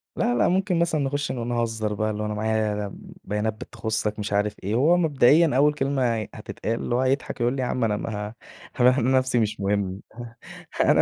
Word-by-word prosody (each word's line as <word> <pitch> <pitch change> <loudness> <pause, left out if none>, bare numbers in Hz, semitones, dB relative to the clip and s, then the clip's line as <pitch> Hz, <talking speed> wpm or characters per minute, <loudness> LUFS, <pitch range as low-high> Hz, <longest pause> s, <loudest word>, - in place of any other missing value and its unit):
لا، 120 - +1
لا، - - +3
ممكن 185 -1 +1
مثلًا 170 -3 +1
نخش 145 +1 -1
ن 120 -2 -4
نهزر 115 -3 -1
بقى، 110 +1 -1
اللى 105 0 -4
هو - - -2
أنا 105 - -2
معايا 105 -1 -1
ب - - -11 0.2
بيانات 105 +2 -1
بتخصك 110 0 -3
مش 105 0 -3
عارف 105 0 +1
إيه، 100 +4 -1
وهو 155 +8 +4
مبدئيًا 150 -1 +4
أول 150 +1 +4
كلمة 135 -4 0
هي 110 -2 -4
هتتقال 115 +1 -4
هو 125 - +2
هيضحك 130 -1 -1
يقول 120 +3 +1
لي: 130 - -2
يا 125 - -1
عم 125 - -1
أنا 105 -2 +1
ما 105 -1 -4 0.5
ه - - -2
أنا 130 +1 +4
نفسي 130 -1 +2
مش 110 -1 -1
مهم 100 -1 -1 0.8
أنا - - +5
115 Hz, 205 wpm, -24 LUFS, 105-135 Hz, 0.8 s, أنا